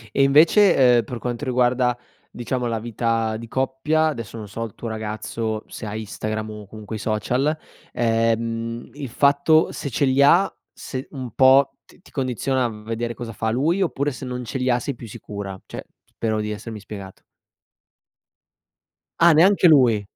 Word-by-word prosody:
E 135 - +4
invece, 145 - +6
uhm, 115 - +1
per 120 +1 -6
quanto 125 +4 -4
riguarda, 125 -1 +2 0.3
diciamo, 120 +1 -3
la 115 -2 -2
vita 115 -1 -1
di 115 +1 -8
coppia, 135 +5 0
adesso 115 -7 -4
non 105 -2 -7
so 115 +3 -5
il 110 - -8
tuo 115 - -6
ragazzo 110 0 -4
se 110 - -8
ha 105 - -5
Instagram, 110 0 -4
o 105 -1 -9
comunque 110 +1 -8
i - - -5
social, 125 +8 0 0.4
ehm, 115 0 -1
il 145 -3 -6
fatto 140 +5 +3
se 140 - -5
ce 135 +4 0
li 130 +1 +2
ha 175 +7 +5 0.2
se 130 0 -7
un 130 -5 -6
po' 135 +1 +5
ti - - -22
ti - - -19
condiziona 130 -1 -1
v 105 -1 -10
vedere 115 +1 -3
cosa 115 -1 -7
fa 110 +1 -2
lui, 160 +11 +1
oppure 145 -4 0
se 130 - -8
non 125 -1 -5
ce 130 - -4
li 130 0 -1
ha 120 - +3
sei 140 +2 -4
più 115 - -10
sicura? 100 -2 -7
Cioè - - -7
p - - -39
spero 110 -1 0
di 105 0 -3
essermi 105 0 -7
spiegato. 100 -2 -10 2.0
Ah 170 -1 +8
neanche 180 +2 +5
lui, 125 -8 +5
120 Hz, 180 wpm, -22 LUFS, 110-135 Hz, 2.0 s, Ah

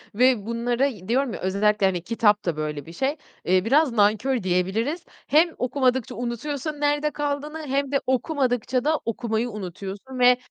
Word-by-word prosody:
ve 245 -3 +3
bunları 240 +3 0
y 205 -8 -8
diyorum 255 0 +1
ya - - -5
özellikle 200 +2 +1
hani; 180 -3 +1
kitap 210 -3 +2
da 165 -3 -1
böyle 150 -2 -4
bir 165 - -11
şey, 275 - -1 0.3
eee, 185 +2 +3
biraz 280 +2 +4
nankör 220 +2 +2
diyebiliriz. 205 - 0 0.2
Hem 325 +4 +5
okumadıkça 255 -2 0
unutuyorsun 275 +5 -4
nerede 295 +1 +1
kaldığını, 295 +1 -3
hem 275 +1 -1
de 275 - +1
okumadıkça 255 -2 0
da 310 +1 +1
okumayı 230 +1 -1
unutuyorsun 200 +5 -7
ve 250 0 +6
245 Hz, 160 wpm, -24 LUFS, 210-280 Hz, 0.3 s, ve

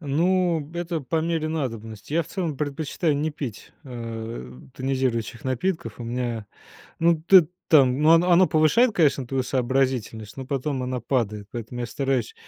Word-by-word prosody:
Ну 170 +3 +1
б 150 +4 -10
это 170 -2 -2
по 140 +4 -3
мере 160 -1 -1
надобности. 115 -7 -5
Я, 170 +2 +2
в - - -15
целом, 170 -7 -3
предпочитаю 150 +2 -1
не 155 +2 -1
пить, 135 -8 -7
э, 115 - -6 0.2
тонизирующих 130 -3 -2
напитков. 160 +7 -2
У 120 - -6
меня, 120 -2 -3 0.5
ну, 165 -1 +3
ты 175 -1 +6 0.2
там 135 -3 +5
ну, 155 +1 +5
оно 175 +2 +4
оно 180 +2 +6
повышает, 170 - +4
конечно, 140 -6 +2
твою 130 0 -1
сообразительность, 125 -4 -1
но 135 -1 -6
потом 135 0 -2
она 125 0 -3
падает. 105 -4 -1
Поэтому 120 +1 -6
я 120 - -2
стараюсь 130 -1 -1
135 Hz, 165 wpm, -24 LUFS, 120-160 Hz, 0.5 s, ты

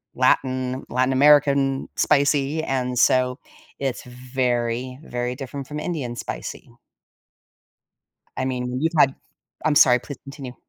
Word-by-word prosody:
Latin 130 0 +1
Latin 130 +2 +1
American 140 -1 +4
spicy, 145 +1 +2
and 125 -3 -2
so, 125 0 +3 0.4
it's 135 -3 -3
very, 125 0 -2
very 125 -1 -3
different 135 0 -7
from 150 0 -5
Indian 140 -9 -4
spicy. - - -7 1.7
I 130 - -1
mean, 125 -1 -3
you've 165 +1 0
had 135 -2 +5 0.5
I'm 155 - +2
sorry, 125 -3 +6
please 135 +3 -9
continue. 135 -2 -9
130 Hz, 120 wpm, -23 LUFS, 125-140 Hz, 1.7 s, sorry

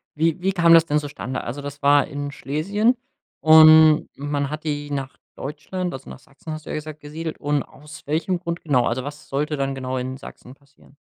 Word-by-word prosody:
wie 165 +2 0
wie 190 +2 +1
kam 170 -2 +5
das 165 -1 +7
denn 150 -2 +1
zustande? 140 -3 -5
Also, 130 +5 -5
das 145 +1 -8
war 145 0 +4
in 145 0 -5
Schlesien 200 - 0 0.4
und 155 0 +7
man 145 0 -2
hat 155 +1 -6
die 145 -1 -3
nach 135 -2 -4 0.2
Deutschland, 175 +6 -5
also 135 0 -9
nach - - -10
„Sachsen“ 140 +4 -12
hast 155 0 -8
du - - -10
ja - - -3
gesagt, 155 0 -7
gesiedelt. 155 +2 -6
Und 145 -1 0
aus 150 +2 -14
welchem 165 +5 -1
Grund 170 -1 -4
genau? 135 -6 +2
Also, 125 +2 -1
was 145 +2 -9
sollte 150 +2 -1
dann 135 0 -1
genau 130 0 -4
in 130 +1 -4
Sachsen 130 -2 -12
passieren? 140 0 -24
150 Hz, 205 wpm, -22 LUFS, 140-160 Hz, 0.4 s, das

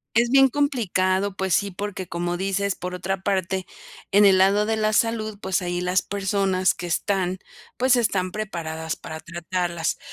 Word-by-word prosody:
es 235 +1 +4
bien 270 0 +7
complicado, 200 -9 0
pues 190 -2 -1
sí, 200 - +2
porque, 190 -1 -5
como 175 +1 -2
dices: 195 +1 -1
"Por 180 0 -5
otra 190 +1 -3
parte, 190 -1 -1 0.4
en 205 +1 +6
el 190 -1 +6
lado 200 +2 +4
de 220 +1 0
la 215 -1 +1
salud, 220 -2 0
pues, 190 0 0
ahí 175 0 -2
las 180 +1 +1
personas 195 -2 0
que 175 0 -6
están, 185 +1 0 0.4
pues 255 +1 +4
están 195 -6 0
preparadas 160 -6 -4
para 160 0 -8
tratarlas". 170 0 -2
190 Hz, 165 wpm, -24 LUFS, 180-205 Hz, 0.4 s, bien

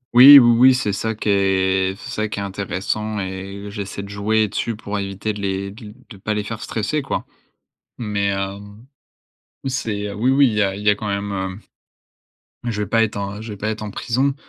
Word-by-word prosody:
Oui, 135 +4 +12
oui, 120 -3 +7
oui, 130 +1 +8
c'est 105 -5 -1
ça 110 +3 -2
qui 105 - -3
est 95 -1 +2
c'est - - -9
ça 110 0 -1
qui 105 - -6
est - - -2
intéressant 100 +2 -3
et 100 +1 -6
j'essaie 100 -1 -5
de 100 - -9
jouer 105 +2 +1
dessus 115 +3 -2
pour 105 -1 -4
éviter 100 +2 -3
de 105 - -7
les 100 0 -2
d 105 0 -11 0.2
de 105 - -12
pas 105 +2 -2
les 105 - -1
faire 115 +1 -6
stresser 115 +8 -2
quoi. 135 - -3 0.7
Mais 105 -3 -1
hem, 100 +3 -5 0.8
oui - - 0
c'est 105 -6 -3
oui, 115 +6 +1
oui, 140 0 +5
il 115 - -1
y 105 - +1
a 95 -1 +1
il 100 +2 -7
y 105 - +4
a 105 - +4
quand 105 +1 -5
même 100 0 -2
heu, 95 0 -4 1.1
je 105 -1 -3
vais 105 - -2
pas 115 +3 +3
être, 100 -2 -3
je 110 -2 -6
vais - - -10
pas 105 +2 -2
être 110 0 -4
en 105 - -5
prison 130 +7 0
105 Hz, 220 wpm, -21 LUFS, 100-110 Hz, 1.1 s, Oui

